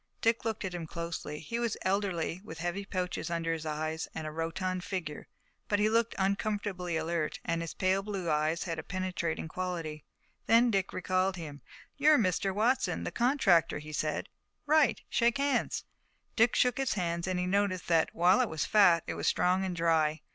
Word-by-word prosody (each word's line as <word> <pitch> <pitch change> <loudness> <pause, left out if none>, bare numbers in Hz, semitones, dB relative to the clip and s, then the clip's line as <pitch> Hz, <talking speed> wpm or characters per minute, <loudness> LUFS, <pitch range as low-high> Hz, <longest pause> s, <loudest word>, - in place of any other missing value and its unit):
Dick 230 0 +2
looked 220 -2 -2
at 185 - -4
him 170 -2 -5
closely. 170 -2 -5
He 230 +9 -4
was 235 -2 -1
elderly, 185 -3 -1
with 160 -5 -9
heavy 175 +4 -3
pouches 185 -2 -3
under 165 -1 -1
his 160 -1 -5
eyes 155 +1 -3
and 160 - -4
a 155 - -4
rotund 180 +3 -2
figure, 175 -6 -5 0.4
but 205 - +2
he 210 +1 +3
looked 230 +1 +1
uncommonly 195 -3 -1
alert 160 -1 -2
and 165 0 -1
his 165 - -5
pale 190 +1 +2
blue 195 -3 -4
eyes 155 +2 +1
had 165 -3 -3
a - - -5
penetrating 180 -4 -3
quality. 165 -4 -4 0.4
Then 235 +1 +5
Dick 195 -2 0
recalled 185 +1 0
him. 150 -5 -8 0.4
"You're 300 +1 +6
Mr. 195 -2 +1
Watson, 225 +7 +1
the - - -3
contractor," 235 - +3
he 155 +1 -8
said. 155 +1 -1 0.4
"Right. 305 -1 +4
Shake 235 +2 +2
hands." 280 0 0 0.5
Dick 225 +1 +4
shook 250 +1 +2
his 270 -5 0
hand, 170 -2 -2
and 185 -1 0
he 180 - 0
noticed 190 -1 0
that, 165 -2 +3
while 180 +7 +4
it 245 - 0
was 160 - -2
fat, 180 -6 +5
it - - -3
was - - -3
strong 185 +1 +2
and 185 -2 -2
dry. 160 -2 +2
185 Hz, 185 wpm, -30 LUFS, 165-205 Hz, 0.5 s, You're